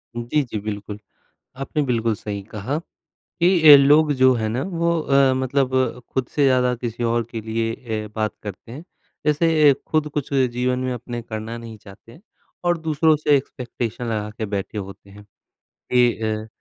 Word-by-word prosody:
उ, 120 - -3
जी, 145 +5 0
जी, 115 -4 -5
बिल्कुल। 105 0 -6 0.6
आपने 150 +2 -1
बिल्कुल 115 -4 0
सही 100 -1 -6
कहा, 115 +8 -3 0.6
कि 170 -3 +5
अ, - - +12
लोग 150 +2 +5
जो 130 -1 +4
है 110 -3 -1
ना 120 +4 -2
वो 170 -2 0
अ, 140 -3 +3
मतलब 130 0 0
अ, 130 -1 0
खुद 130 -2 -1
से 145 - +3
ज़्यादा 125 -2 +3
किसी 120 0 -5
और 120 0 +1
के 115 - -5
लिए 115 +1 -2
ए 110 -3 -5
बात 110 -1 -1
करते 105 +2 -8
हैं, 140 +7 -9 0.4
जैसे 150 -1 +4
खुद 155 -1 +1
कुछ 145 -1 -3
जीवन 125 -1 +1
में 130 0 -2
अपने 120 0 -6
करना 110 0 -6
नहीं 115 -1 -9
चाहते 100 +2 -16
हैं, 145 - -16 0.4
और 175 -1 +2
दूसरों 160 0 +2
से 150 -1 +2
एक्सपेक्टेशन 125 -3 -5
लगा 105 -2 -2
के 110 - -2
बैठे 100 +1 -4
होते 100 0 -8
हैं। 105 +1 -14 0.7
ये 125 -1 +5 0.3
अ, - - -12
125 Hz, 180 wpm, -22 LUFS, 110-145 Hz, 0.7 s, अ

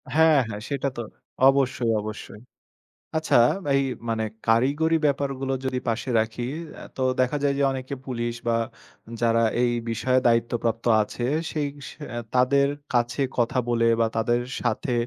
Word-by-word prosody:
হ্যাঁ, 160 -2 +6
হ্যাঁ। 105 -2 -6
সেটা 140 -1 -1
তো 120 - -2 0.5
অবশ্যই, 130 -3 +1
অবশ্যই। 105 0 -8 0.8
আচ্ছা? 155 -5 +2 0.4
এই 140 - +3 0.3
মানে 110 -1 0 0.2
কারিগরি 140 +8 +3
ব্যাপারগুলো 135 -2 0
যদি 130 -1 -1
পাশে 120 +3 -2
রাখি, 110 +2 -2 0.5
তো 130 - -3 0.2
দেখা 130 +4 +1
যায় 140 -1 +2
যে, - - +2
অনেকে 130 +1 -4
পুলিশ 120 -2 -2
বা 115 0 +3 0.6
যারা 115 0 +3 0.2
এই 120 -1 +3 0.2
বিষয়ে 130 +3 +2
দায়িত্বপ্রাপ্ত 115 0 0 0.2
আছে। 120 +3 -5 0.3
সেই 150 -2 -1 0.2
স - - -7 0.3
এ - - -3 0.2
তাদের 140 +2 +4 0.3
কাছে 120 +1 +1 0.2
কথা 120 +2 +2
বলে 115 -1 +2
বা 115 - +3
তাদের 120 +2 +1 0.2
সাথে 120 +2 -1
125 Hz, 145 wpm, -25 LUFS, 115-140 Hz, 0.8 s, হ্যাঁ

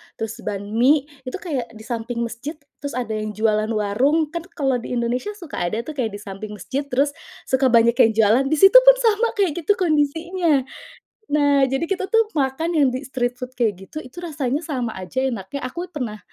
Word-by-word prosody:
terus 225 +1 -5
banh 205 -1 -4
mie, 260 +6 +4 0.2
itu 255 - -5
kayak 255 -9 -4
di 220 - -11
samping 235 0 -4
masjid, 240 +7 -5 0.2
terus 285 0 -5
ada 245 -3 -3
yang 215 0 -3
jualan 215 0 +1
warung, 255 +10 +1
kan 340 -1 -4
kalau 270 -4 +1
di 240 - -6
Indonesia 245 - -1
suka 345 -7 -9
ada 215 +7 -1
tuh 310 - -6
kayak 225 -5 -1
di - - -7
samping 210 +1 -7
masjid, 270 +8 -4
terus 280 +2 +1 0.3
suka 265 0 +2
banyak 235 -1 +4
yang 225 - +6
jualan, 225 +4 +4
di 310 - +2
situ 390 +9 +8
pun - - +7
sama 450 +1 +3
kayak 395 -6 +2
gitu 410 - +5
kondisinya. 325 -2 +1 0.6
Nah, 285 -3 +3
jadi 270 +7 -2
kita 380 0 -1
tuh 450 +1 +2
makan 275 +5 0
yang 305 -5 +3
di 255 - -3
street 250 -3 -2
food 250 0 -7
kayak 225 -5 +2
gitu 195 - -8
itu 310 +4 -9
rasanya 295 -3 -2
sama 255 -7 -3
aja 185 +7 -6
enaknya, 235 +2 -4
aku 345 +8 -6
pernah 240 -10 -4
260 Hz, 200 wpm, -22 LUFS, 230-310 Hz, 0.6 s, situ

